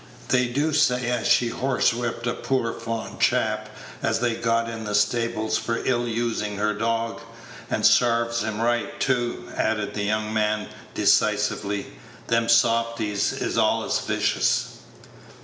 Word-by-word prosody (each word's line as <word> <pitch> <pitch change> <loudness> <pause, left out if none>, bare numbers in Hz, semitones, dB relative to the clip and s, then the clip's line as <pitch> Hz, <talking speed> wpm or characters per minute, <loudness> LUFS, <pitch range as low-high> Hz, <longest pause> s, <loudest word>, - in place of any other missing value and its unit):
They 125 -1 +3
do 145 +6 0
say 125 -5 +2
as 120 -2 -1
she 120 - +4
horsewhipped 120 -2 0
a 120 - 0
poor 125 -3 -1
fond 115 -1 -5
chap - - +1 0.3
as - - 0
they'd 120 -1 -1
got 115 0 +1
in 115 -1 -6
the 105 -1 -2
stables 110 +1 +1
for 115 0 -2
ill 120 -2 +1
usin' 115 -3 -2
her 105 +1 +1
dog; 115 +1 -2 0.5
and - - 0
sarve 115 -1 +3
him 110 -1 -3
right 120 +1 -1
too," 120 -3 -1
added 105 -2 -1
the 105 - -3
young 110 +1 -1
man, 105 -1 0 0.3
decisively. 100 0 +1 0.4
"Them 115 0 +2
softies 115 -3 +2
is - - -2
allus - - +1
vicious." - - 0
115 Hz, 140 wpm, -24 LUFS, 110-120 Hz, 0.5 s, she